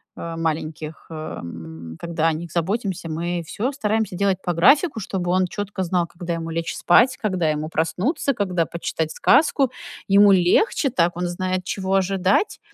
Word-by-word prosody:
э, 165 Hz, 0 st, -6 dB
маленьких, 155 Hz, -1 st, -4 dB
эм, 85 Hz, -, -8 dB
когда 165 Hz, -1 st, -1 dB
о 165 Hz, -, +2 dB
них 165 Hz, +1 st, -6 dB
заботимся, 185 Hz, +1 st, -2 dB
мы 170 Hz, +2 st, -2 dB
всё 235 Hz, +10 st, -2 dB
стараемся 220 Hz, -7 st, -1 dB
делать 195 Hz, 0 st, +1 dB
по 175 Hz, -, -1 dB
графику, 275 Hz, -, +4 dB
чтобы 185 Hz, -3 st, -3 dB
он 185 Hz, 0 st, +2 dB
чётко 205 Hz, +1 st, -5 dB
знал, 175 Hz, -1 st, 0 dB
когда 170 Hz, 0 st, -5 dB
ему 165 Hz, 0 st, -4 dB
лечь 165 Hz, 0 st, -3 dB
спать, 250 Hz, +9 st, +4 dB
когда 185 Hz, -7 st, 0 dB
ему 155 Hz, +1 st, -2 dB
проснуться, 180 Hz, -, 0 dB
когда 180 Hz, -6 st, 0 dB
почитать 160 Hz, -2 st, -3 dB
сказку. 280 Hz, -4 st, +3 dB, 0.4 s
Ему 200 Hz, +1 st, +6 dB
легче 195 Hz, -, +3 dB
так, 175 Hz, -5 st, +1 dB
он 180 Hz, 0 st, -1 dB
знает, 185 Hz, +1 st, -2 dB
чего 190 Hz, +1 st, -2 dB
ожидать. 195 Hz, -, +1 dB
180 Hz, 160 wpm, -22 LUFS, 165-200 Hz, 0.4 s, Ему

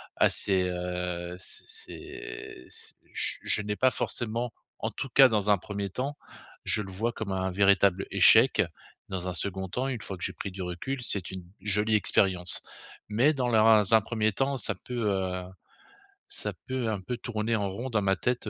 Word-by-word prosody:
ah! -, -, +4 dB
C'est, 95 Hz, -2 st, +2 dB
heu, 90 Hz, -1 st, -3 dB
c'est 95 Hz, -, -4 dB
c'est -, -, -7 dB
c'est -, -, -8 dB, 0.2 s
j -, -, 0 dB
je -, -, +2 dB
n'ai 105 Hz, 0 st, -2 dB
pas 130 Hz, +4 st, +3 dB
forcément, 120 Hz, 0 st, -2 dB, 0.3 s
en -, -, -1 dB
tout 135 Hz, -, -5 dB
cas 135 Hz, +2 st, +8 dB
dans 105 Hz, -3 st, +1 dB
un 100 Hz, -, +5 dB
1er 100 Hz, +1 st, -4 dB
temps, 135 Hz, +8 st, -3 dB, 0.5 s
je 110 Hz, -, +2 dB
le 95 Hz, -, -7 dB
vois 110 Hz, +6 st, -1 dB
comme 105 Hz, -3 st, -4 dB
un 95 Hz, 0 st, -1 dB
véritable 100 Hz, 0 st, +3 dB
échec. -, -, +6 dB, 0.5 s
Dans 95 Hz, -1 st, -4 dB
un -, -, -3 dB
2d 95 Hz, +1 st, -3 dB
temps, 125 Hz, +8 st, -2 dB
une 125 Hz, -5 st, -3 dB
fois 100 Hz, -2 st, -4 dB
que 90 Hz, -, -9 dB
j'ai -, -, -2 dB
pris -, -, -5 dB
du 95 Hz, 0 st, -6 dB
recul, 90 Hz, +10 st, -4 dB
c'est 100 Hz, -6 st, -1 dB
une 95 Hz, -1 st, -7 dB, 0.2 s
jolie 105 Hz, +2 st, +2 dB
expérience. 95 Hz, -4 st, +3 dB, 0.5 s
Mais 120 Hz, +9 st, +4 dB
dans 130 Hz, -2 st, 0 dB
la 110 Hz, -2 st, +4 dB
run 110 Hz, -1 st, +6 dB
un 110 Hz, -1 st, +7 dB
1er 110 Hz, 0 st, 0 dB
temps, 135 Hz, +6 st, 0 dB
ça 115 Hz, -, 0 dB
peut, 125 Hz, +6 st, -8 dB
heu, 95 Hz, -2 st, -1 dB, 0.9 s
ça -, -, -4 dB
peut 130 Hz, -3 st, -1 dB
un 105 Hz, -2 st, -1 dB
peu 125 Hz, +7 st, -4 dB
tourner 115 Hz, -1 st, -2 dB
en 100 Hz, -2 st, -1 dB
rond 120 Hz, +7 st, -5 dB
dans 110 Hz, -2 st, +2 dB
ma 95 Hz, -1 st, +2 dB
tête 120 Hz, +2 st, -1 dB
105 Hz, 195 wpm, -28 LUFS, 95-115 Hz, 0.9 s, cas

